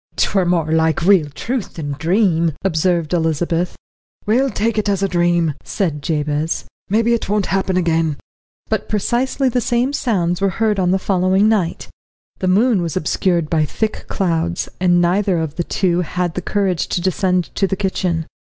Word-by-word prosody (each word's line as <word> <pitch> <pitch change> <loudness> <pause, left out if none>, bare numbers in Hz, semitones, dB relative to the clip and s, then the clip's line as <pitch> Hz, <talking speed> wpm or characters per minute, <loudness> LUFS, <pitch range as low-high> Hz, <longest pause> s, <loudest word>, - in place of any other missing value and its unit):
"'Twere 190 -3 +1
more 170 -3 +1
like 160 0 +2
real 180 -5 +4
truth 230 - -4
than 145 -3 -4
dream," 165 +1 +1
observed 170 -2 +1
Elizabeth. 170 +1 0 0.5
"We'll 255 +6 +2
take 220 0 0
it 210 - -1
as 200 -1 0
dream," 175 -3 +1
said 160 -7 -2
Jabez. 150 0 -1 0.2
"Mebbe 225 +3 +2
it 235 -4 0
won't 210 -1 +1
happen 190 -1 0
again." 165 -4 +1 0.5
But - - -2
precisely 245 +6 0
the 250 0 +1
same 240 +4 0
sounds 180 -10 0
were 195 - +3
heard 215 -3 +1
on 180 -1 +2
the 190 - +3
following 190 +1 +2
night. 205 -7 0 0.5
The 185 - -1
moon 205 +2 +3
was 170 +1 -2
obscured 175 -1 0
by 155 0 +1
thick 215 +8 -3
clouds, 170 -2 -1
and 175 -1 +3
neither 185 +1 +2
of 160 -3 -2
the 175 - 0
two 180 0 0
had 180 0 -2
the 180 - -3
courage 190 -2 0
to - - -1
descend 185 0 0
to 195 - +1
the 195 - -1
kitchen. 180 -4 -1
180 Hz, 170 wpm, -19 LUFS, 165-205 Hz, 0.5 s, real